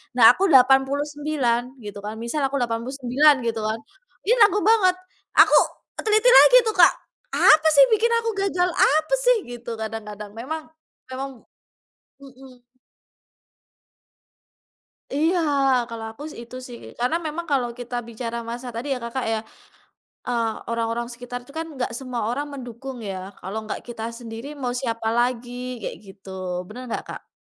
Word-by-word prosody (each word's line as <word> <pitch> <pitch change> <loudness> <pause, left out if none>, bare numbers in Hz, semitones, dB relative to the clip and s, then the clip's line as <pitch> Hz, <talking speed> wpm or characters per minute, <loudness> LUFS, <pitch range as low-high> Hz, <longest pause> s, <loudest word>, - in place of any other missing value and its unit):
nah 230 -3 +8
aku 390 - +2
89 270 -1 +2
gitu 205 -1 -7
kan. 210 +1 -5
Misal 235 +6 -3
aku 275 - -5
89 255 +5 +2
gitu 225 -1 -1
kan, 215 +1 -2 0.5
ini 475 - +5
nanggung 410 0 +3
banget, 385 -5 +5 0.4
aku - - +7 0.5
teliti 435 +2 +3
lagi - - +9
tuh, 435 - -1
Kak, 345 -3 +7 0.4
"Apa 310 +1 +6
sih 280 - +7
yang - - -7
bikin 465 +3 +1
aku 460 - -2 0.2
gagal? 360 -1 +1
Apa 315 - +3
sih?" - - +6 0.2
Gitu, 240 0 -8
kadang-kadang. 210 -2 -6
Memang 305 +7 -5 0.4
memang 270 +1 -4 0.9
mhm. 260 -2 -15 2.5
Iya, 320 +6 +1 0.5
kalau 230 -1 -6
aku 225 +7 -11
sih - - -10
itu 245 - -12
sih. 240 -1 -9 0.2
Karena 250 +7 +1
memang 315 +2 -4
kalau 250 -3 +1
kita 245 0 -6
bicara 235 0 -5
masa 240 +2 -6
tadi 240 +5 -4
ya - - -3
Kakak 235 +2 -3
ya, 220 - 0 0.9
eee, 235 -2 0 0.2
orang-orang 230 0 -2
sekitar 245 +1 -7
itu 280 - -16
kan 325 - -2
nggak 250 -3 -3
semua 255 -3 -4
orang 280 +5 -2
mendukung 255 0 -8
ya. 190 - -4 0.2
Kalau 195 +3 -6
nggak - - -4
kita 230 -2 -7 0.2
sendiri, 230 +1 -8
mau 245 -1 -1
siapa 230 -3 -3
lagi? 245 0 0 0.3
Kayak - - -5
gitu. 195 0 -14 0.4
Bener 235 +5 -9
nggak, - - -3
Kak? - - -9
250 Hz, 150 wpm, -23 LUFS, 230-295 Hz, 2.5 s, lagi